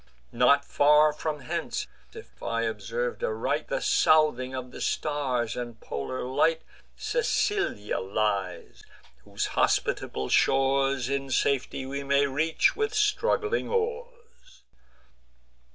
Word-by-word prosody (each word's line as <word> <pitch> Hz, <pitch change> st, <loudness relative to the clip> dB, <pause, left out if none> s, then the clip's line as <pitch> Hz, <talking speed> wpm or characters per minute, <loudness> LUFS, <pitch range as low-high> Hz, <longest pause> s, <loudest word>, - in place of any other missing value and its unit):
Not 140 Hz, +4 st, +4 dB
far 150 Hz, +1 st, +4 dB
from 150 Hz, -1 st, -4 dB
hence, 130 Hz, -, -3 dB, 0.3 s
if -, -, -14 dB
I 115 Hz, 0 st, -1 dB
observ'd 485 Hz, -, -3 dB
aright 460 Hz, -2 st, -1 dB
The -, -, -2 dB
southing 155 Hz, -, +3 dB
of 125 Hz, -1 st, -6 dB
the -, -, -9 dB
stars, 130 Hz, -6 st, -1 dB
and 120 Hz, -2 st, -6 dB
polar 70 Hz, -, -5 dB
light, 150 Hz, +6 st, +1 dB, 0.3 s
Sicilia 415 Hz, -, -1 dB
lies, 100 Hz, -2 st, -2 dB, 0.4 s
whose -, -, -3 dB
hospitable 65 Hz, -, 0 dB
shores 135 Hz, -1 st, +2 dB
In 135 Hz, 0 st, -2 dB
safety 130 Hz, +1 st, 0 dB
we 140 Hz, +1 st, -4 dB
may 140 Hz, +1 st, +3 dB
reach 150 Hz, +4 st, +1 dB
with 435 Hz, 0 st, -1 dB
struggling 425 Hz, +2 st, +1 dB
oars." 470 Hz, -, -5 dB
140 Hz, 110 wpm, -27 LUFS, -, 0.4 s, Not